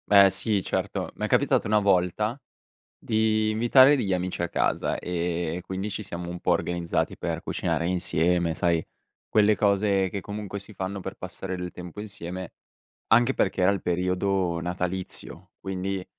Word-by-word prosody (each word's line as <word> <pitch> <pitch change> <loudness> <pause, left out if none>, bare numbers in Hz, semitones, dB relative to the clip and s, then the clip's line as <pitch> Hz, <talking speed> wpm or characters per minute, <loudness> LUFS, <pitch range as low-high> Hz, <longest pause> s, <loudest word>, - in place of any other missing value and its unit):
Beh 100 -1 +8
sì 105 -1 +1
certo. - - -2
M'è - - -2
capitato - - +2
una 105 0 +4
volta 100 +3 +1 0.6
di 110 0 +1
invitare 125 +6 +6
degli 100 -7 0
amici 90 -1 -2
a 85 - -1
casa, - - 0
ehm, 85 -1 -2
quindi 95 +3 -4
ci 105 +1 -4
siamo 85 -3 -6
un 90 0 -6
po' - - +1
organizzati 85 -1 -1
per - - -3
cucinare 85 - -1
insieme 85 -1 +1
sai, 85 -1 +1 0.4
quelle 105 0 +4
cose 100 -2 +2
che 100 +1 -4
comunque 105 0 -6
si 100 +2 -11
fanno 95 +1 -4
per 95 +1 -6
passare 95 +1 -6
del 90 -1 -5
tempo 90 +2 -9
insieme, 95 -3 -6 0.6
anche 120 +3 +5
perché 95 - 0
era 90 - +5
il 100 -2 -1
periodo 90 0 0
natalizio, 90 +1 -5
quindi 95 0 -3
95 Hz, 155 wpm, -26 LUFS, 90-105 Hz, 0.6 s, Beh